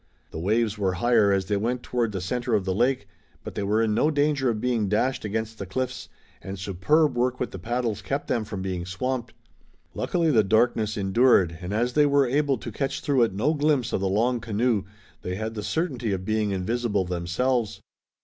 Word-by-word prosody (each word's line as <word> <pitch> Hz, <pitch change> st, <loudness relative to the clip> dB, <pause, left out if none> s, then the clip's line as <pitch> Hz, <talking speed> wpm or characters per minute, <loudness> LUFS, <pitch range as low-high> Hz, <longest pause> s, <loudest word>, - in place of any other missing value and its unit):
The -, -, -6 dB
waves 105 Hz, +4 st, 0 dB
were 95 Hz, -2 st, +1 dB
higher 110 Hz, +1 st, +3 dB
as 95 Hz, -1 st, +1 dB
they 100 Hz, +1 st, 0 dB
went 120 Hz, +4 st, -2 dB
toward 120 Hz, -3 st, -1 dB
the 95 Hz, -3 st, -4 dB
center 120 Hz, +5 st, -1 dB
of 100 Hz, -3 st, 0 dB
the 95 Hz, -, 0 dB
lake, 125 Hz, +6 st, +1 dB, 0.4 s
but -, -, -7 dB
they -, -, -3 dB
were 105 Hz, +3 st, +1 dB
in 110 Hz, -1 st, +1 dB
no 150 Hz, +8 st, +3 dB
danger 145 Hz, -3 st, +1 dB
of 110 Hz, -2 st, -1 dB
being 115 Hz, -4 st, 0 dB
dashed 130 Hz, +6 st, 0 dB
against 110 Hz, +1 st, -3 dB
the 100 Hz, -, -5 dB
cliffs, 130 Hz, +6 st, -4 dB, 0.3 s
and 95 Hz, +1 st, -6 dB
superb 125 Hz, -, +1 dB
work 125 Hz, +1 st, 0 dB
with 125 Hz, -, -2 dB
the 95 Hz, -, -7 dB
paddles 115 Hz, 0 st, -2 dB
kept 140 Hz, +9 st, -3 dB
them 115 Hz, -, 0 dB
from 100 Hz, -3 st, -6 dB
being 90 Hz, -2 st, -3 dB
swamped. 120 Hz, +7 st, -3 dB, 0.6 s
Luckily 170 Hz, -3 st, 0 dB
the 110 Hz, -6 st, +4 dB
darkness 110 Hz, +1 st, +2 dB
endured, 95 Hz, -4 st, +3 dB
and, 90 Hz, +2 st, -5 dB
as 120 Hz, +4 st, 0 dB
they 150 Hz, +1 st, +4 dB
were 140 Hz, -1 st, +4 dB
able 140 Hz, +1 st, +1 dB
to 115 Hz, -, -7 dB
catch 135 Hz, +5 st, -2 dB
through 140 Hz, -3 st, +2 dB
it 115 Hz, -4 st, +2 dB
no 135 Hz, +10 st, +1 dB
glimpse 145 Hz, -5 st, +1 dB
of -, -, 0 dB
the 95 Hz, -, 0 dB
long 120 Hz, +5 st, +1 dB
canoe, 115 Hz, -2 st, 0 dB, 0.4 s
they 90 Hz, -, -4 dB
had 110 Hz, +3 st, -4 dB
the 105 Hz, -, -5 dB
certainty 125 Hz, -, -1 dB
of 95 Hz, -1 st, -4 dB
being 110 Hz, 0 st, 0 dB
invisible 100 Hz, +1 st, -1 dB
themselves. 95 Hz, +5 st, -1 dB
110 Hz, 205 wpm, -25 LUFS, 100-125 Hz, 0.6 s, the